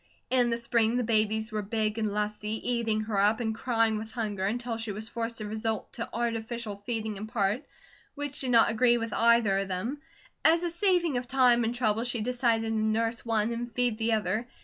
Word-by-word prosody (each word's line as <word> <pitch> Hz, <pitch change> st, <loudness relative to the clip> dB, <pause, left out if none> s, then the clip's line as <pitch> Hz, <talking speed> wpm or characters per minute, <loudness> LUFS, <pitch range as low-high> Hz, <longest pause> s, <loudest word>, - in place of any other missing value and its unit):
In 250 Hz, -2 st, +3 dB
the 235 Hz, -, 0 dB
spring 235 Hz, -1 st, +1 dB
the 250 Hz, -, +1 dB
babies 220 Hz, 0 st, +1 dB
were 215 Hz, -1 st, -1 dB
big 215 Hz, +1 st, -1 dB
and 215 Hz, -2 st, 0 dB
lusty, 210 Hz, +1 st, -2 dB
eating 230 Hz, -3 st, 0 dB
her 215 Hz, -2 st, -1 dB
up, 210 Hz, +3 st, +3 dB
and 225 Hz, -2 st, -1 dB
crying 225 Hz, -2 st, +1 dB
with 220 Hz, 0 st, -7 dB
hunger, 210 Hz, -5 st, -2 dB
until 235 Hz, +2 st, -2 dB
she 225 Hz, -1 st, -3 dB
was 215 Hz, +2 st, -5 dB
forced 230 Hz, 0 st, -4 dB
to 215 Hz, -, -4 dB
resort 220 Hz, 0 st, -3 dB
to 230 Hz, -, -5 dB
artificial 230 Hz, -2 st, -3 dB
feeding 215 Hz, 0 st, -4 dB
in 215 Hz, +2 st, -6 dB
part, 220 Hz, +2 st, 0 dB, 0.5 s
which 290 Hz, -1 st, -5 dB
did 260 Hz, -, -2 dB
not 235 Hz, -1 st, +5 dB
agree 240 Hz, +2 st, +4 dB
with 230 Hz, -2 st, -4 dB
either 230 Hz, -4 st, +4 dB
of 195 Hz, -, -2 dB
them. 210 Hz, +10 st, -3 dB, 0.4 s
As 330 Hz, +2 st, +5 dB
a 345 Hz, -, 0 dB
saving 345 Hz, -5 st, +2 dB
of 245 Hz, 0 st, -4 dB
time 250 Hz, -3 st, +4 dB
and 230 Hz, +2 st, -1 dB
trouble 225 Hz, -2 st, +1 dB
she 240 Hz, -2 st, -1 dB
decided 235 Hz, -1 st, +1 dB
to -, -, -1 dB
nurse 225 Hz, +1 st, 0 dB
one 225 Hz, -1 st, +1 dB
and 240 Hz, +1 st, -5 dB
feed 245 Hz, -2 st, 0 dB
the 225 Hz, 0 st, +1 dB
other. 215 Hz, +2 st, -1 dB
225 Hz, 210 wpm, -28 LUFS, 215-240 Hz, 0.5 s, not